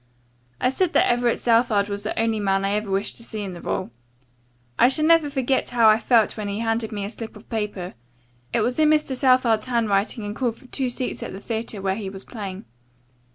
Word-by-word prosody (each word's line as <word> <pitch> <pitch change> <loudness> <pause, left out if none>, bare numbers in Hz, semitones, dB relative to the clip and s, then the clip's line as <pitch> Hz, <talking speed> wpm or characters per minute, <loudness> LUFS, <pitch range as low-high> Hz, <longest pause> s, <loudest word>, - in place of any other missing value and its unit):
I 255 - +2
said 350 +4 0
that - - +4
Everett 240 -1 +2
Southard 230 -4 +3
was 200 0 -3
the - - -3
only 225 -1 +1
man 195 -1 +1
I 195 - 0
ever 210 0 -1
wished 195 +1 -1
to 230 - -11
see 220 -2 -6
in 190 -2 -5
the 170 - -9
role. 185 - -3 0.9
I 245 - +7
shall 305 +3 +2
never 325 -2 +5
forget 265 -2 0
how 235 -2 +4
I 215 +1 +5
felt 230 -2 +3
when 210 -2 -4
he 200 0 -3
handed 225 0 -1
me 205 -2 -3
a - - -4
slip 225 0 -7
of 210 - -14
paper. 210 -5 -3 0.6
It - - +1
was 245 +6 0
in 310 -1 +5
Mr. 305 -3 +2
Southard 255 -4 +3
's - - -8
handwriting 225 -2 0
and 205 0 -5
called 240 -3 -1
for 255 - -18
two 260 0 -2
seats 250 +1 -4
at - - -6
the 190 - -7
theatre 220 -2 -4
where 190 -1 +1
he 200 -3 -4
was 195 0 -8
playing. 200 -4 -7
225 Hz, 230 wpm, -23 LUFS, 205-245 Hz, 0.9 s, I